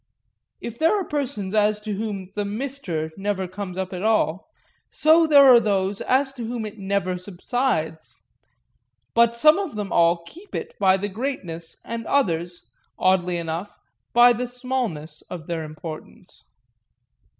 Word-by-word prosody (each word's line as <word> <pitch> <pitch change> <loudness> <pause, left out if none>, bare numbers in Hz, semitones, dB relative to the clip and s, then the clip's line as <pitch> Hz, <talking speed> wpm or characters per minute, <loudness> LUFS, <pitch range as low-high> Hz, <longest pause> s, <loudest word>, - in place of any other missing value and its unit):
If 235 0 -7
there 330 +6 +3
are - - -1
persons 265 -11 -3
as 210 0 +3
to 210 -1 -4
whom 195 -2 -4
the 205 - -2
"Mr." 205 - -4
never 195 -2 -1
comes 185 0 -6
up 190 0 -3
at 180 - -4
all, 215 - +1 0.4
so 320 +1 +4
there 285 -2 +8
are 250 -3 +9
those 200 -2 0
as 270 +1 +1
to 245 -3 -7
whom 230 -1 -3
it 215 0 -8
never 190 -2 -1
subsides; 180 -4 -2 1.0
but 235 0 +4
some 305 +8 +5
of 380 - -4
them 205 -3 -4
all 170 0 +3
keep 355 - -12
it - - -4
by 190 -1 +4
the 200 +2 -3
greatness 190 -8 -5
and 230 -1 -5
others, 175 - 0 0.3
oddly 180 -1 +2
enough, 170 +4 -5 0.3
by 240 +1 +7
the 245 +2 -3
smallness 245 - -4
of 170 -4 -7
their 165 -1 -3
importance. 155 +1 -10
205 Hz, 150 wpm, -23 LUFS, 180-245 Hz, 1.0 s, are